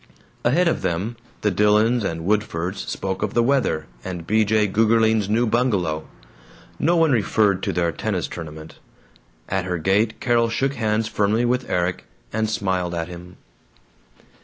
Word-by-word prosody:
Ahead 170 Hz, +9 st, +3 dB
of 165 Hz, -, 0 dB
them, 95 Hz, +8 st, -2 dB, 0.3 s
the 105 Hz, -, +2 dB
Dillons 105 Hz, +4 st, +3 dB
and 80 Hz, -4 st, -3 dB
Woodfords 95 Hz, -3 st, -1 dB
spoke 95 Hz, -1 st, -3 dB
of -, -, -2 dB
the 120 Hz, -, +4 dB
weather 125 Hz, -, +1 dB, 0.2 s
and 90 Hz, -3 st, -6 dB
B. 110 Hz, +4 st, +3 dB
J. 110 Hz, 0 st, +2 dB
Gougerling's 110 Hz, 0 st, +2 dB
new 115 Hz, +3 st, +2 dB
bungalow. 100 Hz, -10 st, 0 dB, 0.7 s
No 170 Hz, +3 st, +2 dB
one 165 Hz, -2 st, +4 dB
referred 105 Hz, -4 st, +2 dB
to -, -, -1 dB
their 85 Hz, -1 st, 0 dB
tennis -, -, -2 dB
tournament. 80 Hz, -1 st, -9 dB, 0.7 s
At 95 Hz, -1 st, -1 dB
her 90 Hz, -1 st, -2 dB
gate 100 Hz, +7 st, +1 dB
Carol 120 Hz, -2 st, +2 dB
shook 135 Hz, +4 st, 0 dB
hands 110 Hz, -2 st, 0 dB
firmly 110 Hz, +2 st, +1 dB
with 125 Hz, +1 st, 0 dB
Erik 90 Hz, 0 st, -1 dB, 0.3 s
and 110 Hz, 0 st, 0 dB
smiled 95 Hz, -4 st, -1 dB
at 85 Hz, 0 st, -3 dB
him. 90 Hz, +1 st, -10 dB
105 Hz, 155 wpm, -22 LUFS, 90-115 Hz, 0.7 s, the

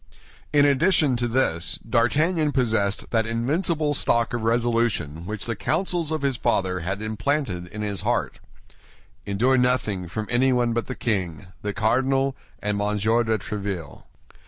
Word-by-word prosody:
In 145 Hz, -1 st, +5 dB
addition 145 Hz, -1 st, +3 dB
to 120 Hz, 0 st, 0 dB
this, 115 Hz, -9 st, +1 dB
D'Artagnan 150 Hz, +7 st, +2 dB
possessed 110 Hz, -6 st, 0 dB
that 115 Hz, -1 st, +1 dB
invincible 150 Hz, +6 st, 0 dB
stock 120 Hz, -4 st, +2 dB
of 120 Hz, -, -1 dB
resolution 115 Hz, -9 st, 0 dB
which 110 Hz, 0 st, -4 dB
the 115 Hz, -, -2 dB
counsels 165 Hz, -, 0 dB
of 155 Hz, -2 st, -2 dB
his 135 Hz, -3 st, 0 dB
father 95 Hz, -7 st, 0 dB
had 95 Hz, +5 st, -3 dB
implanted 110 Hz, -4 st, -2 dB
in 105 Hz, +4 st, -6 dB
his 100 Hz, -3 st, -2 dB
heart: -, -, -1 dB, 0.9 s
"Endure 120 Hz, +7 st, +2 dB
nothing 120 Hz, -7 st, +1 dB
from 110 Hz, +5 st, -4 dB
anyone 120 Hz, -1 st, +2 dB
but 120 Hz, 0 st, -2 dB
the 130 Hz, -, -4 dB
king, 95 Hz, -11 st, -2 dB, 0.2 s
the 105 Hz, -, -2 dB
cardinal, 130 Hz, +6 st, +1 dB, 0.3 s
and 105 Hz, 0 st, 0 dB
Monsieur 105 Hz, +3 st, +1 dB
de 110 Hz, -1 st, +1 dB
Tréville." 100 Hz, -6 st, -5 dB
115 Hz, 145 wpm, -24 LUFS, 100-135 Hz, 0.9 s, In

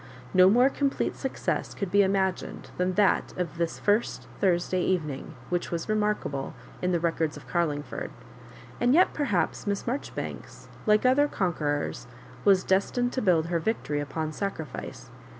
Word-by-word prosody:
No 185 Hz, 0 st, +7 dB
more 245 Hz, +5 st, +6 dB
complete 280 Hz, -1 st, 0 dB
success 265 Hz, -, -2 dB
could 200 Hz, -3 st, -3 dB
be 205 Hz, -, +5 dB
imagined 190 Hz, -1 st, -1 dB
than 180 Hz, 0 st, 0 dB
that 205 Hz, -2 st, +2 dB
of 170 Hz, -2 st, -3 dB
this 170 Hz, -1 st, -1 dB
first 210 Hz, +3 st, +1 dB
Thursday 180 Hz, -1 st, +2 dB
Even 170 Hz, -5 st, 0 dB
ing, 135 Hz, -, -8 dB
which 175 Hz, -1 st, -1 dB
was 170 Hz, -1 st, -3 dB
remarkable 210 Hz, -10 st, -1 dB, 0.3 s
in 180 Hz, -, +1 dB
the 175 Hz, -, +2 dB
records 165 Hz, -2 st, 0 dB
of -, -, -13 dB
Garlingford; 150 Hz, -4 st, -2 dB, 0.7 s
and 245 Hz, +3 st, +4 dB
yet 365 Hz, -, +5 dB
perhaps 290 Hz, -6 st, -1 dB
Miss 200 Hz, -1 st, -1 dB
Maijoribanks, 260 Hz, +4 st, -5 dB, 0.2 s
like 210 Hz, +3 st, +4 dB
other 275 Hz, +3 st, +5 dB
conquerors, 150 Hz, -, -1 dB, 0.4 s
was 195 Hz, -2 st, +5 dB
destined 245 Hz, +6 st, +1 dB
to 260 Hz, -, -1 dB
build 175 Hz, -6 st, +3 dB
her 170 Hz, 0 st, 0 dB
victory 160 Hz, -6 st, -1 dB
upon 155 Hz, +2 st, -3 dB
sacrifice. 160 Hz, -4 st, -5 dB
185 Hz, 150 wpm, -27 LUFS, 165-210 Hz, 0.7 s, No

